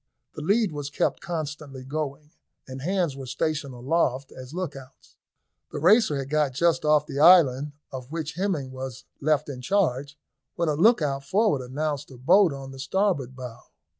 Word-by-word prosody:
The - - -7
lead 205 +5 +2
was 145 -2 -5
kept 145 - -1
constantly 150 -5 -5
going, 150 +1 -5 0.4
and 130 0 -7
hands 175 -2 0
were 135 -1 -8
stationed 145 -1 -2
aloft 135 0 0
as 130 0 -10
lookouts. 145 -7 -8 0.6
The - - -5
Racer 175 0 +4
had 135 -1 -4
got 150 -2 +1
just 170 +4 +2
off 150 -1 +3
the 140 - -5
island 150 -4 +6 0.2
of 130 0 -8
which 160 -1 -4
Hemming 170 -7 -2
was 130 -2 -7
left 150 0 +1
in 130 -3 -6
charge, 145 -4 0 0.4
when 170 -2 0
a - - +2
lookout 150 - +3
forward 195 - +2
announced 145 +3 -3
a 130 - -12
boat 175 +8 +5
on 135 -1 -7
the 135 - -11
starboard 140 -4 0
bow. 125 -3 -8
145 Hz, 165 wpm, -25 LUFS, 135-165 Hz, 0.6 s, island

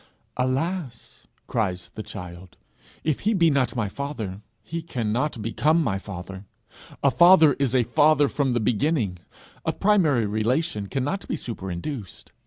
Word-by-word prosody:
'Alas!' 130 +1 -3 0.2
cries 95 -6 -2
the 110 - -6
child, 90 -3 -9 0.5
'if 155 -4 0
he 215 +2 +1
be 170 -4 +4
not 135 -2 +1
my 110 -4 0
father, 110 -6 -5 0.2
he 165 +9 -5
cannot 125 -2 -2
become 155 +9 +2
my 95 -8 -1
father. 95 0 -8 0.6
A 140 - +5
father 170 -2 +7
is 135 -2 +1
a 125 - +4
father 145 +5 +4
from 135 -2 0
the 120 - +1
beginning. 110 - 0 0.4
A - - 0
primary 165 - +3
relation 110 +2 -1
cannot 140 - -2
be - - -1
superinduced. 95 - -6
125 Hz, 140 wpm, -24 LUFS, 105-155 Hz, 0.6 s, father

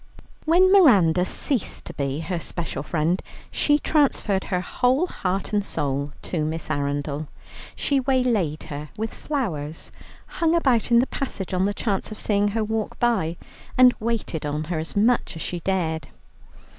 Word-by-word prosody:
When 360 +4 +5
Miranda 195 - +6
ceased 255 +2 -2
to - - -7
be 140 +1 -2
her 170 +2 -3
special 165 -4 -4
friend, 165 +4 0 0.3
she 295 0 +3
transferred 275 -11 +1
her 180 - 0
whole 255 - +1
heart 195 - -3
and 205 -1 +2
soul 140 -5 -2
to 160 -4 -2
Miss 155 0 -3
Arundel. 145 +1 -2 0.5
She 280 -1 +1
waylaid 245 - +1
her 150 0 -7
with 220 +1 -3
flowers, 165 - -4 0.3
hung 330 0 0
about 260 -10 +2
in 235 - +5
the 245 - +5
passage 205 -10 -5
on 185 +1 +2
the 205 - 0
chance 200 -5 -1
of 215 - -7
seeing 205 -1 +1
her 215 +2 0
walk 220 0 -2
by, 190 -9 +1 0.4
and 250 -1 +8
waited 220 -8 -2
on 150 +1 -2
her 160 0 -3
as 160 - -5
much 225 0 +2
as 160 - -5
she 175 - -3
dared. 165 -3 -1
195 Hz, 160 wpm, -24 LUFS, 160-245 Hz, 0.5 s, and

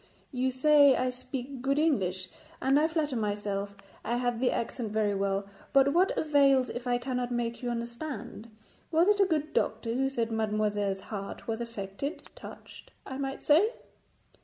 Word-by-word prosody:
'You 260 -1 0
say 285 +1 +6
I 255 0 0
speak 255 +1 -6
good 275 +2 +1
English, 190 - +1 0.3
and 270 +2 +3
I 310 - +3
flatter 310 -4 -1
myself 205 -2 -2 0.3
I 235 +3 -1
have 245 -1 -1
the 255 - +3
accent 230 -1 -3
very 210 -1 +1
well, 195 0 -1 0.3
but 275 0 +5
what 365 +3 +3
avails 275 -4 +3
if 245 +1 -6
I 245 0 +2
cannot 250 0 -2
make 235 0 -2
you 245 - -2
understand? 235 0 -5 0.4
Was 330 +2 +4
it 415 0 +4
a 395 - +6
good 310 -2 -1
doctor 230 +1 0
who 270 +2 +1
said 230 -4 -2
mademoiselle's 210 -3 0
heart 200 -1 -7
was 225 0 -2
affected; 230 - -5
touched, - - -12 0.2
I 265 0 -6
might 270 -1 -4
say?' 360 +11 +4
250 Hz, 165 wpm, -29 LUFS, 220-280 Hz, 0.4 s, say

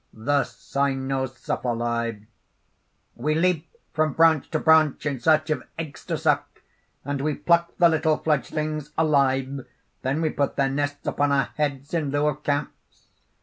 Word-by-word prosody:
_) 110 0 -13
THE 145 0 +3
CYNOCEPHALI: 125 -4 -2 0.9
"We 150 +6 -1
leap 170 -1 +1 0.2
from 155 -2 +1
branch 160 -3 +4
to 155 - 0
branch 155 -2 +4
in 140 -4 -1
search 155 +4 +3
of 155 - 0 0.2
eggs 155 -3 -6
to - - -2
suck; - - -1 0.4
and 140 0 -2
we 150 0 0
pluck 170 0 +1
the 175 - +6
little 160 -1 +2
fledglings 155 0 -2
alive; 140 -3 +2 0.4
then 135 +5 -1
we 155 - +1
put 140 - -1
their 135 -1 +2
nests 145 +1 -2
upon 145 0 +1
our 135 -3 +2
heads 140 -1 -2
in 160 -4 0
lieu 145 +1 +1
of 150 0 -5
caps. 145 0 -4
145 Hz, 150 wpm, -24 LUFS, 135-155 Hz, 0.9 s, the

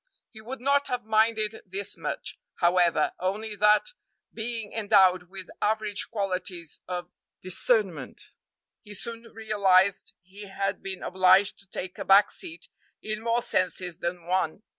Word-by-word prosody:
He 220 - -12
would 245 +3 -7
not 280 +2 +2
have 250 -2 -3
minded 220 0 +1
this 195 +1 -4
much, - - -5 0.2
however, 175 -3 +3
only 210 +4 -2
that, 210 - +4 0.4
being 225 -1 -5
endowed 190 -5 +4
with 190 -1 -8
average 215 -1 0
qualities 185 -5 -4
of 180 -1 -5 0.3
discernment, 185 - 0 0.5
he 205 0 -10
soon 230 +2 -6
realized 200 -3 +2
he 200 +3 -11
had 195 +1 -2
been 190 -1 -6
obliged 185 +2 +4
to 200 - -18
take 185 +2 -6
a - - -2
back 195 +2 +6
seat 170 +2 -7 0.4
in 215 0 -3
more 230 +1 0
senses 180 -1 -1
than 175 -1 -4
one. 180 +1 -1
200 Hz, 140 wpm, -27 LUFS, 185-220 Hz, 0.5 s, back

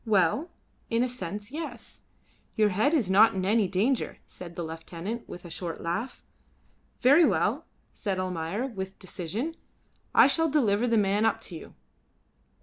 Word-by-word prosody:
"Well, 210 - +2 0.4
in 230 +1 +2
a - - +1
sense 205 -3 -6
yes. 290 -7 -6 0.5
Your 215 -1 +4
head 210 +9 +2
is 220 - +1
not 210 +2 +6
in 185 -1 -1
any 210 0 +3
danger," 210 +8 0
said 170 -2 -10
the 175 - -3
lieutenant, 165 +7 -6
with 175 - -9
a 170 - -9
short 170 -1 -4
laugh. 175 +10 -4 0.8
"Very 285 +7 +7
well," - - +2 0.3
said 195 -5 -2
Almayer, 185 +4 -2
with 190 -7 -6
decision, 200 - -4 0.6
"I - - +9
shall 325 -1 +3
deliver 240 -6 +2
the 230 -1 +3
man 205 +1 +2
up 225 - +2
to 175 - -7
you." 160 - -10
205 Hz, 155 wpm, -28 LUFS, 185-240 Hz, 0.8 s, I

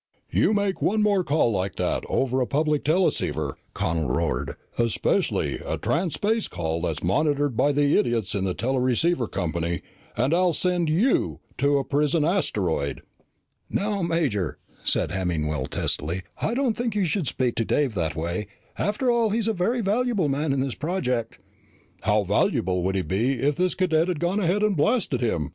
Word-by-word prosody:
"You - - +3
make 200 -2 0
one 215 +2 +2
more 200 -3 +3
call 150 -7 +2
like 95 -2 -2
that - - -1
over 130 0 +1
a 125 - 0
public 150 0 +1
teleceiver," 175 +5 +1 0.2
Connel 80 -4 -1
roared, 65 - -1 0.2
"especially 115 -2 +1
a - - -3
transspace 200 +6 0
call 80 +1 -2
that's 80 -3 -2
monitored 145 - +1
by 135 +5 +3
the 145 0 +2
idiots 115 -5 +1
in 100 -2 -1
the 95 -2 -1
teleceiver 130 - +1
company, 85 -2 -2 0.3
and 130 +7 +2
I'll 180 0 +3
send 175 -1 +1
you 200 +12 +2 0.2
to 140 +2 +3
a 140 - 0
prison 150 +3 +1
asteroid!" 95 - 0 0.7
"Now, 205 0 -1
Major," 145 - 0 0.3
said - - +1
Hemmingwell 80 -6 -1
testily, 85 +6 -2 0.2
"I 230 - 0
don't 260 -3 +1
think 235 -3 -2
you 200 -3 +2
should 175 -2 -1
speak 125 0 0
to 115 - +2
Dave 135 +1 +1
that 80 -6 -1
way. 85 +6 -3 0.3
After 225 +5 +1
all, 235 -2 +2
he's 220 +1 0
a 225 - +2
very 225 +6 0
valuable 210 -4 +1
man 145 +2 0
in 135 -1 +1
this 135 -2 -1
project." 125 -9 -2 0.6
"How - - +2
valuable 90 0 +1
would 95 +1 0
he 95 - 0
be 110 +10 0
if 140 +3 0
this 180 +1 +1
cadet 165 -3 +2
had 180 -5 -1
gone 175 +5 0
ahead 195 +2 +1
and 210 -2 +2
blasted 175 - +1
him?" 80 - 0
145 Hz, 170 wpm, -25 LUFS, -, 0.7 s, You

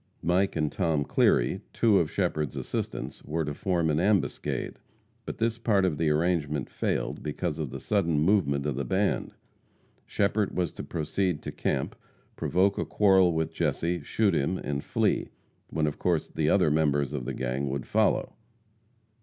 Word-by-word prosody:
Mike 90 +4 +2
and 75 -2 0
Tom 80 -6 0
Cleary, - - +2
two 110 -4 +4
of 80 - 0
Shepherd's 80 -6 -1
assistants, - - -4
were 80 +1 -2
to 75 - -3
form 85 +1 0
an 75 - +1
ambuscade, 100 +1 0 0.5
but - - -5
this 115 0 0
part 105 -5 +2
of 80 -6 -1
the 80 -2 +2
arrangement 75 -3 0
failed - - -2
because 75 +1 -3
of 75 -4 -2
the 65 +2 -6
sudden 85 -2 +1
movement 75 -5 +2
of 75 -3 -1
the 70 - -2
band. 100 +4 0 0.7
Shepherd 100 0 0
was 90 -1 0
to - - -7
proceed 85 +1 -2
to - - -4
camp, - - -2 0.4
provoke 95 +2 +1
a - - 0
quarrel 95 -3 +4
with 80 -1 -1
Jesse, 85 +1 -1
shoot 105 -3 +1
him 70 +7 0
and 70 -4 -3
flee, - - 0 0.4
when 80 -1 0
of 75 - -3
course 85 -4 0
the - - 0
other 75 - +4
members 75 -2 +1
of 65 -4 -3
the 65 - -3
gang 65 +2 -2
would 65 0 -3
follow. - - +1
80 Hz, 170 wpm, -28 LUFS, 75-95 Hz, 0.7 s, two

